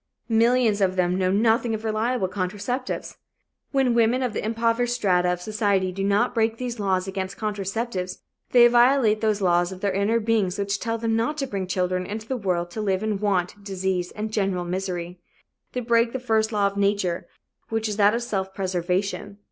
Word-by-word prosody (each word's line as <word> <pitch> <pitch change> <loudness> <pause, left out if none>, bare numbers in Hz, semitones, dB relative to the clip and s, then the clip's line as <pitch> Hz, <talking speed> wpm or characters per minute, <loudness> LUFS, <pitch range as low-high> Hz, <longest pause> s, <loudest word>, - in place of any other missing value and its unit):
Millions 230 -2 +3
of 185 -1 +2
them 180 -1 +1
know 185 -1 +1
nothing 225 +3 +2
of 220 - -7
reliable 220 0 0
contraceptives. 205 +7 -3 0.5
When 265 -3 +2
women 235 +2 +3
of 245 -4 -1
the - - -3
impoverished 230 +2 0
strata 180 -6 +2
of 180 0 -3
society 200 -3 0
do 195 +2 -4
not 200 +5 +2
break 225 -1 +1
these 245 -2 -4
laws 190 -2 0
against 190 0 -4
contraceptives, 200 -2 -3 0.3
they 240 -1 +7
violate 240 -2 +4
those 215 -2 +1
laws 175 -1 +2
of 185 0 -9
their 200 - +1
inner 200 +4 +1
beings 215 -4 0
which 200 0 -1
tell 230 0 -2
them 225 0 0
not 230 +7 0
to 280 - -1
bring 195 -7 -4
children 185 0 -1
into 215 +2 -6
the 260 - -1
world 180 -6 -1
to 215 - -4
live 195 -1 0
in 215 -2 -1
want, 200 -1 -1
disease 190 -2 -2
and 215 +1 -5
general 195 -4 0
misery. 180 -1 -4 0.5
They 250 - -2
break 230 0 +2
the 260 - -2
first 220 -3 +1
law 205 -2 +1
of 200 0 -1
nature, 200 -3 0 0.4
which 225 0 -1
is 210 -1 -3
that 205 +1 +4
of 235 - -2
self 190 -4 -3
preservation. 190 +2 -2
205 Hz, 190 wpm, -24 LUFS, 190-230 Hz, 0.5 s, they